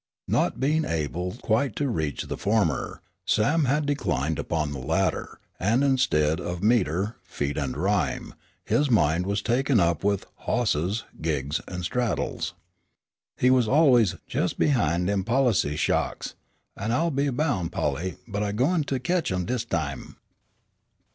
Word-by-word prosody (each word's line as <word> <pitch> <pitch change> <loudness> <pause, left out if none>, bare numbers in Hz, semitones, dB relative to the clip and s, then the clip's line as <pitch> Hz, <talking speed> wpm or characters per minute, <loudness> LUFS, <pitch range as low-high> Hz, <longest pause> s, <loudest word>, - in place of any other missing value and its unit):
Not - - +1
being 155 +4 +2
able 85 - -2
quite 115 +5 +1
to 145 - 0
reach 80 - -2
the - - -5
former, 100 - 0 0.2
Sam 145 +9 +3
had 145 +3 +1
declined 80 - -1
upon 75 -3 -1
the 70 - -5
latter, 80 +8 -1 0.2
and, 115 +8 +2
instead 80 - +2
of 90 0 -4
meter, 105 -2 +1
feet 70 0 -3
and 70 -4 -2
rhyme, - - 0 0.3
his 145 -1 +2
mind 90 -4 +2
was 100 +1 -1
taken 125 0 +2
up 85 -3 +1
with 100 0 +1 0.2
"hosses," 105 -3 0 0.2
"gigs" 75 -1 -1
and 90 -1 -5
"straddles." 120 +2 -2 0.8
He 125 - +4
was 125 -3 +4
always 125 - +4
"jes' - - 0
behin' 90 - +1
dem 100 0 0
policy 115 - +2
sha'ks, - - -1 0.4
an' 110 +3 -3
I'll 165 +7 +1
be 140 0 +1
boun', 125 - 0
Polly, 85 +2 -2
but 105 -2 -3
I 100 -1 -1
gwine 150 +9 +2
to 135 -2 -1
ketch 175 - 0
'em 90 -1 -1
dis 125 +2 -2
time." 70 -5 -3
100 Hz, 150 wpm, -26 LUFS, 80-130 Hz, 0.8 s, He